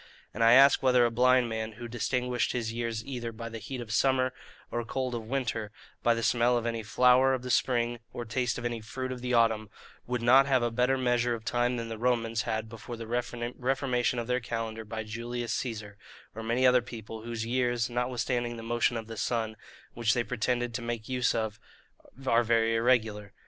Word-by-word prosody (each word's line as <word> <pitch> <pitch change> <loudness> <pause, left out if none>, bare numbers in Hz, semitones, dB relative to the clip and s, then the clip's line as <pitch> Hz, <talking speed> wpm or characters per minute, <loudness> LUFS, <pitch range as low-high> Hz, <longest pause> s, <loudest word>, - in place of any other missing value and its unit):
And 115 - 0
I 115 +1 +7
ask 135 +2 +7
whether 125 -2 +5
a 120 - +1
blind 125 +1 +4
man, 110 -1 -4
who 120 +2 -8
distinguished 125 +1 -1
his 115 -2 -2
years 115 -1 -3
either 120 -4 -4
by 115 +1 -7
the 115 0 -7
heat 130 +3 -6
of 115 -2 -7
summer, 130 +1 +2 0.4
or 120 - -1
cold 130 +2 -3
of 115 -2 -5
winter; 120 -4 -2 0.3
by 120 -1 +3
the 115 - -3
smell 120 +3 +3
of 120 - -3
any 115 -1 -1
flower 125 +4 +4
of 125 - -6
the 125 - -3
spring, 120 -1 +1
or 120 - -5
taste 120 +1 -1
of 120 - -6
any 120 -1 -2
fruit 130 +4 -5
of 125 -1 -6
the 125 0 0
autumn, 110 -2 +2 0.4
would 125 -1 -2
not 135 +3 +6
have 130 -3 +3
a 120 - 0
better 125 +3 +2
measure 120 -1 +1
of 110 -1 -10
time 120 +2 +1
than 115 -1 -4
the 115 -1 -6
Romans 115 -2 +1
had 110 0 -1
before 115 +1 -8
the 115 - -6
reformation 125 +2 -1
of 120 - -2
their 125 +1 0
calendar 115 -2 -4
by 110 +1 -5
Julius 120 +2 -4
Caesar, 105 -4 -4 0.3
or 115 - -6
many 120 +3 +1
other 125 -1 +6
people, 110 -2 -8
whose 115 -1 -4
years, 120 -1 0
notwithstanding 120 -1 -1
the 115 - -7
motion 120 +1 +1
of 115 - -5
the 115 0 -8
sun, 110 -2 -1 0.4
which 115 -2 +1
they 120 - +1
pretended 120 +1 -1
to 120 - -3
make 115 -1 -4
use 125 -1 +1
of, 110 -1 -2 0.7
are 120 -2 +4
very 115 0 +2
irregular? 110 -4 +1
120 Hz, 205 wpm, -29 LUFS, 115-125 Hz, 0.7 s, I